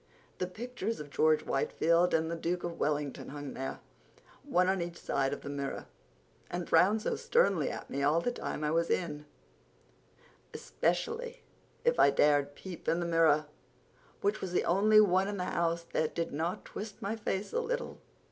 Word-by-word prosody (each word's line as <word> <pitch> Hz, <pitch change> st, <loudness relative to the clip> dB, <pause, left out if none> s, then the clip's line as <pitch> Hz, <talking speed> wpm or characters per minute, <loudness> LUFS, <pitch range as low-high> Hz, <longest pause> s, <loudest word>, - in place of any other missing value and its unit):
The 180 Hz, -, -1 dB
pictures 230 Hz, +2 st, -4 dB
of 145 Hz, -1 st, -8 dB
George 155 Hz, +1 st, +3 dB
Whitefield 170 Hz, +5 st, +2 dB
and 160 Hz, 0 st, +1 dB
the -, -, -1 dB
Duke 175 Hz, +2 st, -2 dB
of 170 Hz, -1 st, -5 dB
Wellington 145 Hz, -2 st, -1 dB
hung 145 Hz, -1 st, -6 dB
there, 135 Hz, 0 st, -5 dB, 0.6 s
one 185 Hz, -11 st, +2 dB
on 190 Hz, -1 st, +1 dB
each 170 Hz, 0 st, -5 dB
side 135 Hz, -1 st, 0 dB
of -, -, -4 dB
the 140 Hz, -, -7 dB
mirror, 140 Hz, -1 st, -4 dB, 0.6 s
and 175 Hz, 0 st, -4 dB
frowned 215 Hz, +3 st, +4 dB
so -, -, 0 dB
sternly 480 Hz, +1 st, +2 dB
at -, -, -6 dB
me 140 Hz, -, -3 dB
all 150 Hz, +4 st, +3 dB
the 245 Hz, -, -1 dB
time 155 Hz, -, -4 dB
I 150 Hz, -, +1 dB
was 165 Hz, +1 st, +1 dB
in, 150 Hz, -4 st, -2 dB, 1.3 s
especially 480 Hz, +1 st, -2 dB, 0.4 s
if 485 Hz, 0 st, +3 dB
I -, -, +7 dB
dared 145 Hz, -1 st, +3 dB
peep 185 Hz, -3 st, -9 dB
in 165 Hz, -, +2 dB
the 175 Hz, -, -1 dB
mirror, 160 Hz, -3 st, +4 dB, 0.8 s
which 205 Hz, +2 st, 0 dB
was 185 Hz, -2 st, -4 dB
the -, -, +1 dB
only 210 Hz, +4 st, +5 dB
one 190 Hz, -2 st, +4 dB
in 205 Hz, 0 st, -3 dB
the 180 Hz, -, -2 dB
house 170 Hz, -1 st, 0 dB
that 155 Hz, -, 0 dB
didn't 165 Hz, +1 st, -2 dB
twist 210 Hz, 0 st, -7 dB
my 205 Hz, +3 st, -1 dB
face 205 Hz, -2 st, -3 dB
a 480 Hz, -, +2 dB
little. -, -, -3 dB
170 Hz, 175 wpm, -31 LUFS, 150-205 Hz, 1.3 s, I